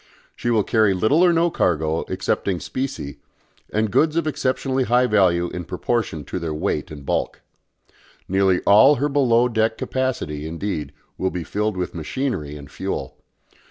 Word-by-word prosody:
She 120 - -3
will 110 -3 +3
carry 110 -3 +3
little 110 - +3
or 180 - +6
no 170 0 +2
cargo 80 - +1
excepting 95 0 -1
specie, 130 - -5 0.5
and 110 -1 0
goods 155 +8 +3
of 170 - +1
exceptionally 135 -2 0
high 125 +2 +3
value 90 -6 +3
in 90 - -5
proportion 90 -3 -2
to - - -4
their 80 -2 -3
weight 75 - -2
and 70 -3 -10
bulk. - - -2 0.9
Nearly 95 -1 +2
all 110 +9 +6
her 145 +3 0
below 125 -4 +3
deck 110 -1 0
capacity, 100 - -2
indeed, 80 -3 -4 0.3
will 95 - +1
be 90 -2 -4
filled 105 +2 -2
with 90 -1 -3
machinery 80 - -3
and 70 -2 -11
fuel. - - -4
105 Hz, 160 wpm, -22 LUFS, 85-130 Hz, 0.9 s, or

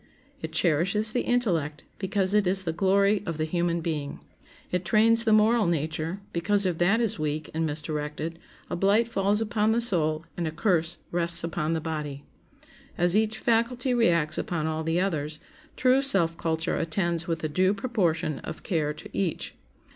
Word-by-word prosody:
It 160 - -5
cherishes 185 +7 +2
the 245 - +1
intellect, 170 -12 -1 0.2
because 195 0 0
it 210 -3 +3
is 190 +1 0
the 165 -3 -2
glory 200 +3 +2
of 165 -2 -3
the 155 - -1
human 170 +1 -1
being. 150 -4 -4 0.5
It 180 0 -1
trains 225 +5 +3
the 220 - +3
moral 215 0 +4
nature, 160 +3 -2
because 200 +4 +1
if 175 -3 -1
that 195 +6 +3
is 225 -8 -1
weak 155 0 -3
and 160 0 0
misdirected 150 +1 -4 0.3
a - - -3
blight 200 +5 +3
falls 205 -1 0
upon 220 0 +1
the 235 - +2
soul 165 -8 0
and 170 -2 -2
a - - -3
curse 170 -1 0
rests 170 -1 +2
upon 165 -1 -2
the 160 - -1
body. 150 -3 -5 0.7
As 175 +1 +2
each 220 0 +1
faculty 240 +3 +1
reacts 170 -10 +2
upon 165 -3 -2
all 160 0 -2
the 165 +2 0
others, 155 -5 -2 0.4
true 255 +1 +4
self 175 -12 +4
culture 160 -1 -1
attends 170 0 -1
with 165 -1 -3
a - - +1
due 185 +6 +1
proportion 180 - -1
of - - -8
care 150 -4 -1
to - - -10
each. 185 -5 -1
175 Hz, 175 wpm, -26 LUFS, 160-210 Hz, 0.7 s, moral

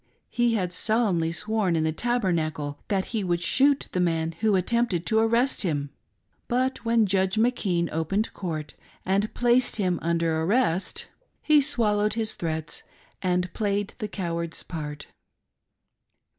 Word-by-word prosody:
He 240 -1 +2
had 180 -4 -1
solemnly 195 -6 +1
sworn 210 -1 0
in 160 - +1
the 160 - +1
Tabernacle 160 -9 -1
that 195 -2 0
he 220 -3 0
would 175 -2 0
shoot 280 +8 +3
the 180 - -1
man 165 -2 +1
who 215 -2 +3
attempted 190 -2 +1
to 220 +5 +3
arrest 235 +4 +2
him; 145 -6 -1 0.6
but 255 +2 0
when 230 -1 +3
Judge 190 0 +1
McKean 215 -7 +1
opened 180 +7 -1
court 160 -5 -5 0.3
and 200 +3 +1
placed 245 +1 +3
him 185 -5 0
under 165 -1 0
arrest 190 -1 +1 0.4
he 305 -1 +5
swallowed 215 -6 +2
his 220 -1 -1
threats 160 -2 -3 0.4
and 180 -1 0
played 205 -1 -1
the 215 - -2
coward's 170 -4 -3
part. 150 -3 -6
190 Hz, 140 wpm, -26 LUFS, 170-225 Hz, 0.6 s, he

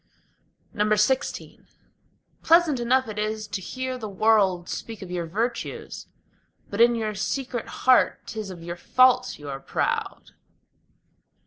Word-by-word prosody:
XVI 215 +4 0 0.8
Pleasant 330 -5 +4
enough 255 +2 +2
it 215 -1 -5
is 215 0 -2
to 200 -2 -4
hear 255 +5 -4
the 215 -3 -5
world 195 -4 +2
speak 225 -4 -6
of 180 - -9
your 175 -2 -3
virtues; 230 +7 -4 0.6
But 205 +3 0
in 240 0 +6
your 220 -2 -2
secret 245 +4 -3
heart 255 -1 +3
'tis 215 -3 -6
of 175 -3 -9
your 175 +1 -6
faults 255 +8 +3
you 145 - -11
are 135 -1 -5
proud. - - -3
215 Hz, 130 wpm, -25 LUFS, 190-250 Hz, 0.8 s, in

